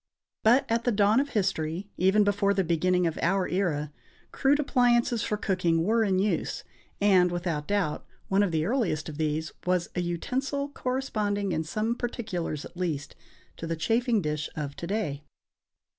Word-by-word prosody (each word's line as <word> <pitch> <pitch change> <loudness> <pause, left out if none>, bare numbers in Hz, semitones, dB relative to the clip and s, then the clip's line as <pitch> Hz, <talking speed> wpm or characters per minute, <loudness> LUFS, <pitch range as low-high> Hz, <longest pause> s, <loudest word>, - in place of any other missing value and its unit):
But 240 +5 +5
at 230 +1 0
the 245 - +2
dawn 210 +2 +4
of 285 +1 0
history, 190 - -1
even 190 +4 +4
before 200 0 +2
the 195 - +2
beginning 180 +2 +2
of 165 -2 -1
our 190 +2 +2
era, 155 -6 -1 0.4
crude 280 +2 +2
appliances 245 -4 +2
for 210 -2 -1
cooking 175 -5 +1
were 225 +4 +2
in 195 -3 +1
use; 200 +3 -1 0.4
and, 185 -3 +4
without 170 -4 -2
doubt, 200 -7 0 0.2
one 195 +1 +3
of 205 - +2
the 160 -1 0
earliest 200 - 0
of 150 0 -8
these 155 0 -1
was 180 -1 0
an 180 - -1
utensil 265 - -2
corresponding 215 -8 -2
in 160 -1 0
some 215 +8 -1
particulars, 190 - -4
at - - -12
least, 155 -5 -3 0.4
to 165 - -5
the 165 - -1
chafing 225 +4 +1
dish 150 0 -2
of 145 -2 -4
to 170 - -5
day. 165 -8 -2
190 Hz, 170 wpm, -27 LUFS, 165-225 Hz, 0.4 s, But